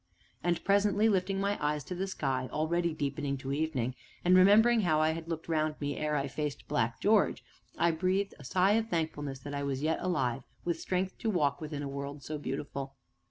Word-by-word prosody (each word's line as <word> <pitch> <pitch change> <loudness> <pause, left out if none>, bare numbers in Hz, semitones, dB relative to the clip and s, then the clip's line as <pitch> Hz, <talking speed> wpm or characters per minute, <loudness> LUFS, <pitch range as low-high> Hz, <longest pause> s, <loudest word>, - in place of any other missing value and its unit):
And 175 -1 0
presently, 205 +2 +4
lifting 195 -1 +1
my 200 -3 -1
eyes 150 0 0
to 180 - -6
the 190 +2 -2
sky, 135 -8 -2
already 170 +3 0
deepening 145 -2 -2
to 135 +1 -4
evening, 140 -5 -1 0.3
and 180 +1 +6
remembering 220 +5 +6
how 155 -5 +2
I 155 0 +3
had 165 0 -5
looked 165 -1 -4
round 155 -2 0
me 145 -1 -2
ere 150 0 -1
I 140 -1 0
faced 145 +1 -4
Black 115 +2 0
George, 210 0 +3 0.3
I 170 - +3
breathed 185 +4 0
a - - -11
sigh 185 +8 +3
of 225 +1 +2
thankfulness 145 -6 -2
that 145 +2 -7
I 140 - -2
was 140 0 -2
yet 160 +1 +1
alive 135 -8 0 0.2
with 170 -2 -1
strength 185 0 -2
to 225 - -1
walk 155 -6 +1
within 150 -2 -4
a - - -3
world 140 +1 -6
so 150 +3 -4
beautiful. 135 -1 -5
155 Hz, 205 wpm, -31 LUFS, 140-185 Hz, 0.3 s, and